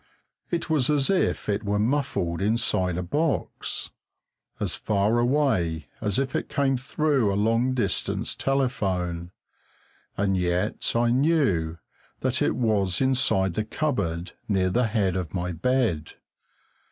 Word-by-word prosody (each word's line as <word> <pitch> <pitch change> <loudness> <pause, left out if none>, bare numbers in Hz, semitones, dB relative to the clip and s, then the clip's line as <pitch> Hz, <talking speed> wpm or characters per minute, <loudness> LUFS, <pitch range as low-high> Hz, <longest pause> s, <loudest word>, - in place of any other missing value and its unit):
It 170 -1 -1
was 155 -6 +2
as 145 +2 +3
if 190 - 0
it 100 -1 0
were 100 0 0
muffled 105 - 0
inside 100 -4 +1
a 90 - -2
box, 150 - -2 0.7
as - - +1
far 105 +2 +1
away 120 - +1
as 105 -3 0
if 135 -1 -1
it - - -2
came 135 -1 +1
through 135 -3 +1
a - - -1
long 115 +5 +2
distance 100 -7 -1
telephone; 95 -11 -1 0.9
and 100 -1 +1
yet 90 +3 0
I 120 0 +3
knew 125 - +2 0.4
that - - 0
it - - +2
was 105 -7 +1
inside 130 -8 +2
the 110 - -1
cupboard 105 - -2 0.2
near 95 -3 +1
the 120 +3 +2
head 100 -5 0
of 90 -3 -3
my 90 0 -2
bed. 90 - 0
110 Hz, 135 wpm, -25 LUFS, 90-130 Hz, 0.9 s, as